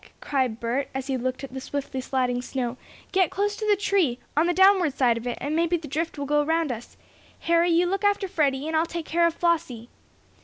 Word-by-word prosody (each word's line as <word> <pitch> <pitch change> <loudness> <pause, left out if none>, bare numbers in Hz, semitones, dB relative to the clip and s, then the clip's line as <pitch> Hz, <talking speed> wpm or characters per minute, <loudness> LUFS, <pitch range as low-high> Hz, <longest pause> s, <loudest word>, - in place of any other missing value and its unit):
cried 255 -5 -1
Bert, 240 +4 -2
as 265 -1 -3
he 270 -1 -1
looked 255 +1 -3
at 265 -2 -8
the 265 - -5
swiftly 275 -1 -4
sliding 250 -2 -1
snow, 250 -1 -3 0.4
"get 375 -4 +3
close 410 +1 -1
to 430 -2 -4
the 415 - +5
tree 380 -10 +1 0.2
on 315 +3 +3
the - - +3
downward 370 -5 +4
side 245 -4 +3
of 230 +1 -5
it, 245 - -3
and 295 +2 -2
maybe 335 +1 +2
the 315 -2 -9
drift 320 +3 -3
will 285 - -3
go 295 +1 +2
around 320 -1 0
us. 235 0 -8 0.4
Harry, 335 +1 +3
you 340 +1 +3
look 390 +3 -1
after 405 -1 +2
Freddie, 290 -6 0
and 320 - -2
I'll 320 +2 +2
take 335 -1 -5
care 340 +2 +2
of 335 - -3
Flossie!" 320 -10 -1
305 Hz, 230 wpm, -25 LUFS, 260-345 Hz, 0.4 s, the